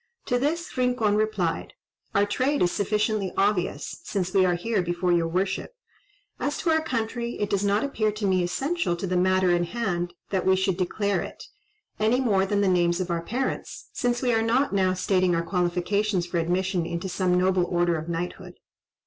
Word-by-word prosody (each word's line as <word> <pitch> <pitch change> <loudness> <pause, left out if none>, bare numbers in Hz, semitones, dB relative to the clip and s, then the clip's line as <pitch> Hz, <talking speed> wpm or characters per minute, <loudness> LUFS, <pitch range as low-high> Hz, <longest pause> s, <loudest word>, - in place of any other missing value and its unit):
To 245 - +1
this 330 +6 -2
Rincon 250 -4 +1
replied, 210 -6 -1 0.4
"Our 200 +1 +4
trade 255 +7 +1
is 175 - +2
sufficiently 210 -1 0
obvious, 195 -3 0
since 185 -3 -2
we 190 -2 +5
are 175 - +2
here 200 +3 0
before 175 +1 -1
your 170 -1 +2
worship; 190 - -2 0.6
as 290 - -1
to 330 - 0
our 320 0 +3
country, 235 -2 -3
it 205 - -1
does 200 0 +1
not 205 +1 +2
appear 220 -6 0
to 210 0 -3
me 185 -2 +2
essential 270 - -1
to 170 - -4
the 185 -1 -1
matter 185 0 +3
in 175 0 +2
hand 175 -4 -2 0.2
that 190 -2 0
we 190 0 +4
should 190 -1 0
declare 195 +1 0
it, - - -8 0.6
any 220 +4 +3
more 200 -7 +2
than 205 +1 +1
the 200 - +2
names 175 -1 +2
of 185 -1 -2
our 170 -1 0
parents, 250 +9 -4
since 245 0 -1
we 245 -2 +2
are 225 - +3
not 240 +4 +1
now 185 -2 +2
stating 185 -1 +2
our 170 - 0
qualifications 180 +3 0
for 175 -1 -2
admission 180 +2 0
into 170 +3 -3
some 180 -1 +1
noble 185 0 +2
order 175 -1 +1
of 160 +1 -5
knighthood." 170 +1 -4
190 Hz, 190 wpm, -26 LUFS, 180-220 Hz, 0.6 s, we